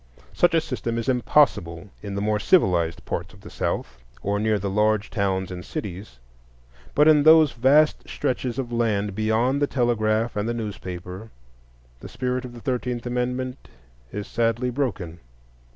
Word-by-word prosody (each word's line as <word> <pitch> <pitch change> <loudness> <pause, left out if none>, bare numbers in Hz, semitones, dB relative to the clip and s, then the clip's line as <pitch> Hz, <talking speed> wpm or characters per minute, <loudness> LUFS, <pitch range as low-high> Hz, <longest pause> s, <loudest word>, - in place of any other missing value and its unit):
Such 175 -1 +3
a 165 - +4
system 120 -6 -3
is 115 - -3
impossible 105 - +2
in 100 -1 -6
the 100 - -2
more 105 0 +1
civilized 85 - +2
parts - - -4
of - - -18
the - - -12
South, 65 -2 -3 0.2
or 100 +1 0
near 110 0 +1
the 100 0 -3
large 105 +1 +1
towns 95 -2 -1
and 90 0 -6
cities; 100 - -7 0.8
but 150 +1 +5
in 155 -2 +6
those 155 -1 +7
vast 140 +5 +3
stretches 125 -1 -2
of 125 -3 -3
land 105 -4 0
beyond 110 +6 +1
the 145 - +3
telegraph 115 -3 0
and 105 +2 -1
the 120 - -1
newspaper 95 -2 -6 0.7
the - - -10
spirit 125 0 -2
of 125 - -9
the 120 - -10
Thirteenth 125 -1 -2
Amendment 125 +1 -3 0.4
is 105 0 -5
sadly 120 +2 0
broken. 95 - -3
115 Hz, 160 wpm, -24 LUFS, 100-125 Hz, 0.8 s, those